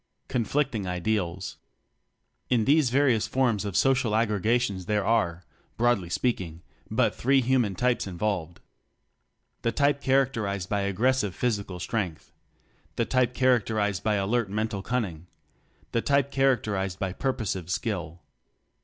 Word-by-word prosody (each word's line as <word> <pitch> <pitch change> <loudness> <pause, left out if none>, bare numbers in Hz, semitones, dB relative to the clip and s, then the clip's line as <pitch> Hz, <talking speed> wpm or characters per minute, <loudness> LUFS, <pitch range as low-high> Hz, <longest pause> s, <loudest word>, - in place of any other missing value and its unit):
Conflicting 125 -3 0
Ideals. 90 0 -2 0.9
In 115 -3 +2
these 145 -1 +4
various 125 -4 +2
forms 120 -6 +1
of 100 -3 -2
social 130 -5 +2
ag 115 0 +2
gregations 105 -2 0
there 105 -2 +1
are, 90 -7 +1 0.3
broadly 115 -7 +2
speak 120 +4 0
ing, 85 -1 -9 0.3
but - - +2
three 135 +2 +3
human 120 -6 +1
types 125 +2 +1
involved: 90 -3 -3 1.0
The 115 - 0
type 140 +2 +2
characterized 115 -9 +1
by 100 -2 0
aggres 125 +7 +2
sive 100 -6 -2
physical 100 -7 -2
strength; 95 -6 -3 0.6
the 115 - +1
type 125 -1 +1
char 130 -2 +4
acterized 105 -3 -1
by 110 0 +1
alert 105 +2 0
mental 105 -1 -2
cunning; 95 -8 -3 0.6
the 115 - +1
type 140 +1 +1
characterized 105 -9 +1
by 95 -2 -2
purposive 100 -9 -2
skill. 90 -5 -3
110 Hz, 135 wpm, -27 LUFS, 95-125 Hz, 1.0 s, these